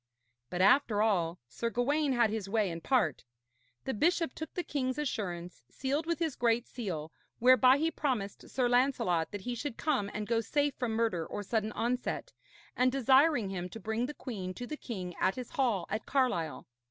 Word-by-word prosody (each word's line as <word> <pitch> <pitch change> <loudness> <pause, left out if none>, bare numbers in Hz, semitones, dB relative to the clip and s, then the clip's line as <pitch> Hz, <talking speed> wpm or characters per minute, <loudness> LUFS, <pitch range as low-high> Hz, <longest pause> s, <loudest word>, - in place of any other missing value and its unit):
But, 180 - -2
after 210 +1 +4
all, 175 -6 +1
Sir 235 - -3
Gawaine 275 +4 +1
had 235 -3 +3
his 215 -3 -3
way 210 -3 +1
in 165 0 -6
part. 220 - +1 0.6
The 265 - -2
bishop 330 - +1
took 315 - -6
the 355 - -1
king's 260 -4 -2
assurance, 180 - -3
sealed 280 - -2
with 335 -1 0
his 325 -5 -1
great 235 0 +2
seal, 170 -10 -5 0.3
whereby 255 +2 +6
he 320 +3 +1
promised 250 -11 -3
Sir 255 -2 +1
Lancelot 245 - +2
that 205 - -6
he 245 +5 -3
should 240 0 -4
come 265 -10 0
and 210 - -4
go 230 +1 +1
safe 290 +5 0
from 240 -3 -2
murder 220 -7 +1
or 205 - -5
sudden 215 +1 -1
onset, 250 - -2 0.4
and 255 +1 +3
desiring 265 -3 +4
him 180 -1 -4
to 225 - -8
bring 220 +3 -1
the 295 - -7
queen 190 -8 -5
to 245 - -5
the 305 - -5
king 190 -11 -6
at 190 - +2
his 250 -2 -7
hall 230 -10 +1
at 215 - -4
Carlisle. 250 - 0
235 Hz, 190 wpm, -31 LUFS, 200-270 Hz, 0.6 s, whereby